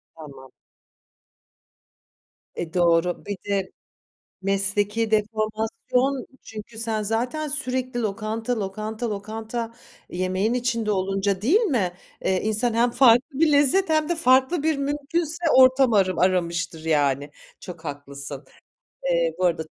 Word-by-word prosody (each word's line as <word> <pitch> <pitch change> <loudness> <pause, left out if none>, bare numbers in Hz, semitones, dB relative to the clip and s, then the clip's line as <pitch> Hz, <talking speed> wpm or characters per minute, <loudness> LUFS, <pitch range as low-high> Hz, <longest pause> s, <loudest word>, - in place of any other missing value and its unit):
Tamam. 140 -4 -12 2.1
E, 170 0 -5
doğru. 175 0 +2
Bir 205 -1 -4
de 195 -2 -1 0.7
mesleki 205 +3 +1
deformasyon 220 +5 -1 0.2
çünkü 220 +1 -10
sen 225 -1 -1
zaten 245 +9 -2
sürekli 255 -3 -1
lokanta, 220 +3 -2
lokanta, 215 +4 -4
lokanta 220 +3 -5 0.4
yemeğin 185 +5 -1
içinde 235 -3 -1
olunca 195 0 -1
değil 335 - +4
mi, 235 - 0 0.3
eee, 185 -1 +1
insan 220 +2 0
hem 240 +1 +3
farklı 260 +4 +4
bir 320 -2 +4
lezzet 290 +7 +3
hem 310 -1 +2
de 345 - 0
farklı 265 +3 +3
bir 315 -2 +1
mümkünse 295 +4 -2
ortam 260 -1 +6
arım 185 -4 +2
aramıştır 170 -3 0
yani. 145 -2 +1 0.3
Çok 175 -3 -10
haklısın. 140 -1 -7 0.6
Eee, - - +1
bu 185 - +1
arada 165 -2 +1
220 Hz, 120 wpm, -24 LUFS, 185-255 Hz, 2.1 s, ortam